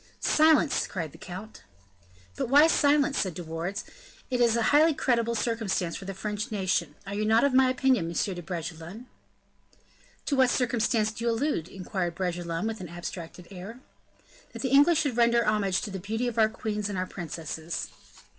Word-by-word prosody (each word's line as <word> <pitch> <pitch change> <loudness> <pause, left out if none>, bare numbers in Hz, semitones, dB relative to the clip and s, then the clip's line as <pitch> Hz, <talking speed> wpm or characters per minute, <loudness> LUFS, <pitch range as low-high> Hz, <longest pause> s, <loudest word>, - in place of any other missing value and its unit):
"Silence!" 310 -2 +3
cried 165 -5 -4
the - - -14
count. 190 +5 -9 0.7
"But - - -3
why, 290 +3 +7
silence?" 290 -2 +3
said 185 -5 -1
De 175 - -6
Wardes; 165 +5 -4 0.5
"it 250 -1 +1
is 235 -1 +4
a 235 - +1
highly 310 +1 +5
creditable 235 -3 +1
circumstance 215 -7 -1
for 195 - -7
the 195 0 -5
French 210 +2 -4
nation. 180 -6 -1
Are 195 - -6
not 215 +2 +3
you - - +6
of 275 - -3
my 260 0 +5
opinion, 255 -8 +2
Monsieur 170 +3 -1
de 175 - -6
Bragelonne?" 170 +5 -6 1.2
"To 285 - 0
what 260 -2 +4
circumstance 230 -3 +1
do 230 +2 -6
you - - +3
allude?" 230 - -1
inquired 185 -2 -4
De - - -17
Bragelonne 175 -1 -2
with 220 -2 -3
an 180 - -7
abstracted 175 0 -8
air. 200 +6 -9 0.7
"That - - -6
the 260 - 0
English 290 +5 +5
should 280 -6 -2
render 235 -1 +4
homage 205 -3 +1
to 210 - -5
the 190 - -5
beauty 225 +6 -2
of 235 -1 -2
our 220 -1 +5
queens 210 -2 -3
and 200 - -3
our 185 - -1
princesses." 165 -2 -5
215 Hz, 185 wpm, -27 LUFS, 180-245 Hz, 1.2 s, why